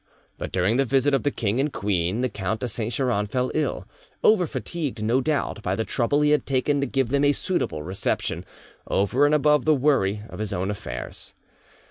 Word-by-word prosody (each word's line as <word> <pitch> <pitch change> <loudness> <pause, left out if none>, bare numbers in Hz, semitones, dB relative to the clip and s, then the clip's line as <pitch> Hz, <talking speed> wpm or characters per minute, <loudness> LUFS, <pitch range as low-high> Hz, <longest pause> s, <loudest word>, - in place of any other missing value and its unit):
But - - -5
during 95 +6 +1
the 135 - +4
visit 135 +2 +2
of 135 - +3
the 145 - +1
king 115 -3 -1
and 145 +2 +1
queen 95 0 0
the 130 - +2
Count 105 +1 -3
de 125 - -1
Saint 115 0 -3
Geran 120 -5 0
fell 125 +3 -1
ill, 155 - -1 0.4
over 195 -6 +5
fatigued, 145 -12 -4
no 120 +5 +2
doubt, 145 -7 -1
by 95 -2 -1
the 110 - -2
trouble 140 +4 +1
he 150 0 +3
had 150 - +2
taken 140 +2 +1
to 140 - 0
give 135 -2 0
them 140 +2 +2
a 145 0 +4
suitable 140 - -2
reception, 95 +4 -2 0.4
over 125 +9 +2
and 150 - +3
above 150 -2 +3
the 155 -1 +5
worry 125 -8 +2
of - - -10
his 105 -1 -2
own 95 +2 -1
affairs. 65 - -6
125 Hz, 205 wpm, -24 LUFS, 105-145 Hz, 0.4 s, over